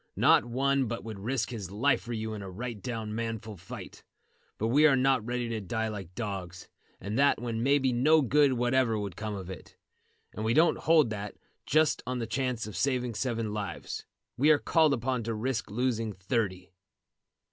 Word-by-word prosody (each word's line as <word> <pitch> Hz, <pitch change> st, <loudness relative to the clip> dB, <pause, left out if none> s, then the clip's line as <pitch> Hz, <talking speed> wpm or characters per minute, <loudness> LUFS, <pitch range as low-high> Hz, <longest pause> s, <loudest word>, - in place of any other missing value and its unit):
Not -, -, +5 dB
one 135 Hz, +2 st, +1 dB
but 115 Hz, +1 st, -4 dB
would 110 Hz, -3 st, -7 dB
risk 120 Hz, +3 st, -2 dB
his 105 Hz, -7 st, -5 dB
life 115 Hz, +9 st, +2 dB
for 120 Hz, -, -8 dB
you 110 Hz, -1 st, -3 dB
in 105 Hz, -, -6 dB
a 95 Hz, -, -7 dB
right 110 Hz, +3 st, -6 dB
down 115 Hz, -4 st, -4 dB
manful 115 Hz, -1 st, -4 dB
fight. 95 Hz, +3 st, -10 dB, 0.5 s
But 110 Hz, -, -1 dB
we 150 Hz, +5 st, +6 dB
are 140 Hz, -, +5 dB
not 130 Hz, -2 st, +2 dB
ready 120 Hz, +1 st, -2 dB
to 110 Hz, -2 st, -3 dB
die 110 Hz, +3 st, -2 dB
like 95 Hz, -4 st, -7 dB
dogs, 95 Hz, -5 st, -5 dB, 0.3 s
and 105 Hz, +6 st, -3 dB
that 140 Hz, 0 st, +4 dB
when 115 Hz, -2 st, -3 dB
maybe 135 Hz, 0 st, +3 dB
no 150 Hz, +6 st, +4 dB
good 140 Hz, +2 st, +4 dB
whatever 120 Hz, -1 st, +2 dB
would 100 Hz, -3 st, -4 dB
come 105 Hz, -1 st, -4 dB
of 95 Hz, -2 st, -7 dB
it; 95 Hz, -1 st, -10 dB, 0.6 s
and 105 Hz, -, -5 dB
we 115 Hz, +2 st, +1 dB
don't 165 Hz, +2 st, +4 dB
hold 155 Hz, -7 st, +4 dB
that, 105 Hz, -1 st, -5 dB, 0.3 s
just 155 Hz, 0 st, +3 dB
on 125 Hz, 0 st, -1 dB
the 120 Hz, -, -2 dB
chance 125 Hz, 0 st, -2 dB
of 105 Hz, -, -8 dB
saving 125 Hz, -3 st, 0 dB
seven 115 Hz, -2 st, -2 dB
lives, 100 Hz, -5 st, -5 dB, 0.3 s
we 145 Hz, +5 st, +4 dB
are 155 Hz, -, +7 dB
called 155 Hz, -1 st, +3 dB
upon 125 Hz, +1 st, -1 dB
to 115 Hz, 0 st, -3 dB
risk 125 Hz, +2 st, -2 dB
losing 115 Hz, -1 st, -1 dB
thirty." 95 Hz, -2 st, -2 dB
115 Hz, 190 wpm, -29 LUFS, 105-130 Hz, 0.6 s, are